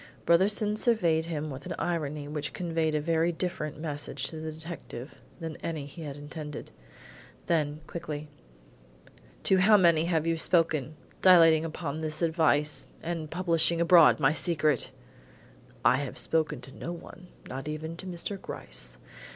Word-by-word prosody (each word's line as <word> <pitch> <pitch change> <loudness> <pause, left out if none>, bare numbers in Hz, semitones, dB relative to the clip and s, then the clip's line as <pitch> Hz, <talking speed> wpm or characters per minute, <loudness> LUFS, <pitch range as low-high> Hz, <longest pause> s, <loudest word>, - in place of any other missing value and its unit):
Brotherson 205 +5 +3
surveyed 170 -10 +2
him 155 -2 -3
with 135 +5 -8
an 170 - -3
irony 150 -4 -2
which 150 0 -4
conveyed 165 -3 -1
a - - +2
very 165 +2 +1
different 165 -4 -3
message 150 -2 -5
to 160 - -7
the 155 0 -5
detective 155 -5 -9 0.2
than 165 -2 -5
any 160 -4 -4
he 145 +4 -10
had 145 -3 -6
intended. 150 0 -7 0.7
Then 150 -2 0
quickly: 155 -3 -6 1.2
"To 190 - +4
how 210 +3 +6
many 170 -4 +4
have 165 -2 +1
you 165 0 +1
spoken, 160 -3 +1 0.3
dilating 165 -3 +7
upon 160 -1 -4
this 155 -1 -2
device, 160 -3 +2 0.2
and 165 -2 -3
publishing 170 -1 +2
abroad 170 -1 +6
my 135 +2 +4
secret?" 155 -5 +1 1.0
"I 130 - +6
have 140 -2 -4
spoken 155 -5 0
to 130 +2 -11
no 170 - -5
one, 175 +1 -10 0.2
not 135 +3 -6
even 155 +2 -4
to 185 - -6
Mr. 185 +2 -4
Gryce. - - -5
160 Hz, 150 wpm, -29 LUFS, 150-170 Hz, 1.2 s, dilating